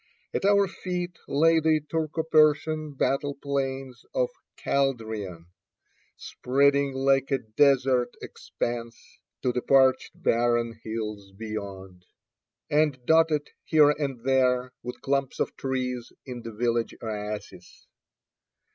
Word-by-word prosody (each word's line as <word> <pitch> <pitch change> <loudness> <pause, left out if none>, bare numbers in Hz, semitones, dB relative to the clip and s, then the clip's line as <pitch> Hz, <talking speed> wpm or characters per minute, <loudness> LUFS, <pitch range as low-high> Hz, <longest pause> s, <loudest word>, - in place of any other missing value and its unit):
At - - -1
our 200 0 +5
feet 180 -1 -5
lay 165 +3 +4
the 160 0 +3
Turco 160 +1 -2
Persian 155 -1 +3
battle 140 +1 0
plains 135 -2 -3
of - - +1 0.3
Chaldiran, 110 -10 -2 0.7
spreading 140 +2 +1
like 135 0 +2
a 135 - +2
desert 125 +1 +2
expanse 115 -1 -5 0.5
to 125 - +2
the 125 - -1
parched 130 +1 +3
barren 120 -5 +1
hills 105 -3 -5
beyond, 95 -4 -7 0.6
and 150 -2 +2
dotted 160 -1 +3
here 150 -2 +5
and 140 -5 -3
there 130 -1 +2
with 125 +1 -7
clumps 135 -1 -1
of - - -1
trees 125 -2 -3
in 125 -2 -7
the 115 0 -7
village 115 +1 -1
oases. 105 -1 -6
135 Hz, 110 wpm, -26 LUFS, 115-150 Hz, 0.7 s, our